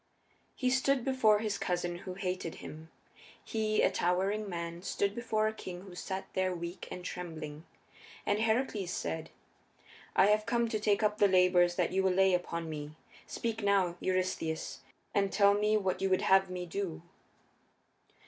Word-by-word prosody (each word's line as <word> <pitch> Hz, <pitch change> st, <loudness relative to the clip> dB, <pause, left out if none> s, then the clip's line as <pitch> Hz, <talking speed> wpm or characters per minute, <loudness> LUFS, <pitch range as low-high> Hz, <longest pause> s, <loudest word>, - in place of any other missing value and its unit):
He 255 Hz, -1 st, 0 dB
stood 265 Hz, -1 st, +2 dB
before 255 Hz, -6 st, +4 dB
his 210 Hz, -2 st, -2 dB
cousin 175 Hz, -1 st, -2 dB
who 185 Hz, -1 st, -7 dB
hated 185 Hz, -3 st, -3 dB
him; 155 Hz, +1 st, -10 dB, 0.5 s
he, 215 Hz, -1 st, 0 dB
a -, -, +4 dB
towering 195 Hz, +4 st, 0 dB
man, 170 Hz, -1 st, -5 dB
stood 200 Hz, +1 st, -1 dB
before 215 Hz, -2 st, 0 dB
a 220 Hz, -, -1 dB
king 180 Hz, -4 st, -7 dB
who 190 Hz, -1 st, -11 dB
sat 190 Hz, +2 st, -4 dB
there 185 Hz, -1 st, 0 dB
weak 170 Hz, +1 st, -6 dB
and 180 Hz, 0 st, -7 dB
trembling. 160 Hz, -4 st, -6 dB, 0.6 s
And 205 Hz, +1 st, +1 dB
Heracles 220 Hz, -4 st, 0 dB
said, 80 Hz, -, -3 dB, 0.9 s
"I 190 Hz, -, +6 dB
have 210 Hz, +1 st, +3 dB
come 235 Hz, -1 st, +2 dB
to 220 Hz, -2 st, -1 dB
take 210 Hz, 0 st, +2 dB
up 210 Hz, 0 st, +1 dB
the 205 Hz, -, +6 dB
labors 180 Hz, -2 st, +4 dB
that 180 Hz, -2 st, +1 dB
you 190 Hz, -, +2 dB
will 190 Hz, -1 st, +2 dB
lay 190 Hz, 0 st, +4 dB
upon 170 Hz, -2 st, -1 dB
me; 150 Hz, -1 st, -6 dB, 0.3 s
speak 225 Hz, -1 st, -3 dB
now, 195 Hz, -4 st, +2 dB
Eurystheus, 185 Hz, -4 st, -1 dB, 0.3 s
and 195 Hz, -1 st, +2 dB
tell 200 Hz, 0 st, +5 dB
me 210 Hz, +1 st, +2 dB
what 190 Hz, -3 st, -1 dB
you 195 Hz, -, +1 dB
would 185 Hz, -, +2 dB
have 190 Hz, 0 st, +4 dB
me 180 Hz, -1 st, -4 dB
do." 175 Hz, -2 st, -4 dB
190 Hz, 165 wpm, -32 LUFS, 175-210 Hz, 0.9 s, I